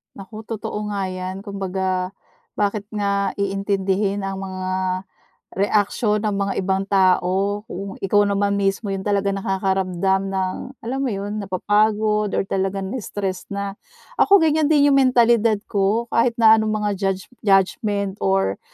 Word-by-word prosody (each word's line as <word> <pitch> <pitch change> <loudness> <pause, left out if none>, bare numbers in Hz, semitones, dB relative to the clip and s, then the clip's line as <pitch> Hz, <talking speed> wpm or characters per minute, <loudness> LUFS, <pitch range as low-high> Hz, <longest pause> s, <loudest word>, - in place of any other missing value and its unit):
Naku 215 +2 -10
totoo 210 -1 -4
nga 200 -2 -2
yan, 185 +1 -5
kumbaga, 190 -2 -2 0.4
bakit 205 0 -1
nga 200 -2 0
iintindihin 195 0 -1
ang 195 0 -4
mga 185 -1 -4 0.8
reaksyon 210 +2 +1
ng 200 - -1
mga 200 0 -1
ibang 190 +1 0
tao 195 +1 +2
kung 195 -1 -7
ikaw 205 +2 +3
naman 200 0 +1
mismo 195 +1 0
'yong 195 - -3
talaga 200 0 0
nakakaramdam 190 -1 0
ng, 190 -1 -1 0.3
alam 255 +4 -3
mo 275 - 0
'yon, 205 0 -3
napapagod 210 +2 +1
or - - +2
talaga 195 0 -2
na-stress 195 -3 -4
na. 200 0 -4 0.5
Ako, 400 - +7
ganyan 310 -1 +2
din 295 -2 +4
'yung - - +4
mentalidad 235 -4 +4
ko, 205 +3 +1
kahit 235 0 +2
na 220 -1 +6
anong 220 - -1 0.2
mga 205 - +1
judge 195 -1 -1 0.2
judgement, 200 0 +1
or 95 0 +1
200 Hz, 140 wpm, -21 LUFS, 190-210 Hz, 0.8 s, Ako